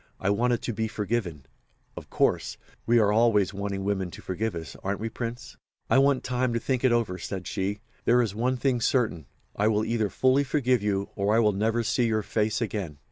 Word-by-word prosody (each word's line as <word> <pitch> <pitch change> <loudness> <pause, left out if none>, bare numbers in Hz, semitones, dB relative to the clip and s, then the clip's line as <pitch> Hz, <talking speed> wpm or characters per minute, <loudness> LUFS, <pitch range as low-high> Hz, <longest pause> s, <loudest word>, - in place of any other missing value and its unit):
I 100 - +1
wanted 120 +3 +1
to 120 - -2
be 110 +1 -1
forgiven, 105 - -3 0.5
of - - -9
course—we 120 +1 0
are 105 -3 +4
always 105 -3 +3
wanting 100 0 -3
women 95 -2 -1
to - - -11
forgive 100 +2 -2
us, 80 -5 -7
aren't 100 +1 -2
we, 115 +2 -3
Prince?" 120 +2 -6 0.3
"'I - - +6
want 135 -1 +3
time 125 -1 0
to 115 - 0
think 130 +1 -1
it 130 - +4
over,' 115 -6 0
said 95 -2 -5
she. 100 +1 -3 0.2
'There 125 +1 +4
is 110 -4 -3
one 125 +4 0
thing 125 -2 0
certain; 110 - 0 0.3
I 105 - +2
will 110 0 +2
either 110 -2 0
fully 130 +5 +3
forgive 130 -4 +1
you, 100 -1 -1
or 100 +1 +1
I - - +5
will 105 -2 +3
never 110 +4 0
see 120 +2 +1
your 110 -1 0
face 110 +2 -1
again. 100 -9 -3
110 Hz, 205 wpm, -27 LUFS, 100-120 Hz, 0.5 s, I